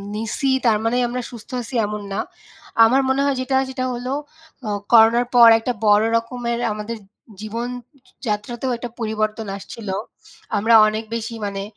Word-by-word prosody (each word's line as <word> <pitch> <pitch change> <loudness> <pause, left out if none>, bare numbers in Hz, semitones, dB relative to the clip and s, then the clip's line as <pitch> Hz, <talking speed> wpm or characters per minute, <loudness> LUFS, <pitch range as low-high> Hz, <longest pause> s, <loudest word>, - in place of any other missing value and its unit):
নিছি, 225 +5 -2 0.2
তার 220 -2 +4
মানে 235 +2 +1
আমরা 250 +1 -3
সুস্থ 230 0 -11
আছি 240 +3 -8
এমন 210 0 -4
না। 200 - -2 0.7
আমার 260 +4 +4
মনে 270 +1 +2
হয় 280 -1 +1
যেটা 265 +1 -1
সেটা 255 -1 -3
হলো 245 +2 -4 0.6
আ - - -2 0.2
করোনার 230 +2 +6
পর 235 -1 +9
একটা 245 +2 -2
বড় 210 +1 +5
রকমের 235 0 -3
আমাদের 215 +2 -5 0.4
জীবনযাত্রাতেও 240 0 -5
একটা 240 0 -6
পরিবর্তন 215 0 -2
আসছিলো। 200 -1 -6 0.6
আমরা 225 +3 +2
অনেক 215 +1 -2
বেশি 230 0 -4
মানে 195 -1 -4
230 Hz, 150 wpm, -21 LUFS, 215-245 Hz, 0.7 s, পর